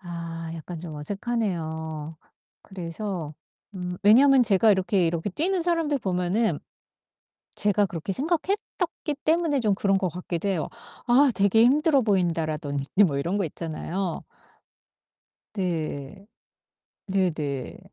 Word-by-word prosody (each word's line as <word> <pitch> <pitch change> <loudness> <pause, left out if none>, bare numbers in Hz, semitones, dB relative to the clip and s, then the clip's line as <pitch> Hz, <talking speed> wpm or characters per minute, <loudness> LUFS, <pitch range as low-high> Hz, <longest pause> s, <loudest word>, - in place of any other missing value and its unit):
아 170 -2 -6
약간 165 +1 -7
좀 160 -2 -7
어색하네요. 160 -4 -3 0.5
그래서 180 -3 -5 0.4
음 180 -1 -4
왜냐면 260 +5 +7
제가 210 +1 +4
이렇게 190 -2 +2
이렇게 165 +3 -1
뛰는 350 - +1
사람들 330 -4 +1
보면은 190 +2 0 1.0
제가 205 0 +2
그렇게 170 +1 -4
생각했었기 340 - -2
때문에 320 -3 +2
좀 210 -3 +2
그런 195 0 +2
것 190 -2 0
같기도 175 +1 -4
해요. 170 -6 -1 0.4
'아 260 +2 +5
되게 200 +3 +4
힘들어 285 +1 +4
보인다.' 175 -7 +1
라든지 145 -3 -1 0.2
뭐 140 -6 -1
이런 175 +8 -1
거 195 - 0
있잖아요. 165 +3 -4 1.3
네. 175 -2 -3 0.8
네네. 155 -9 -1
190 Hz, 260 characters per minute, -25 LUFS, 165-225 Hz, 1.3 s, 왜냐면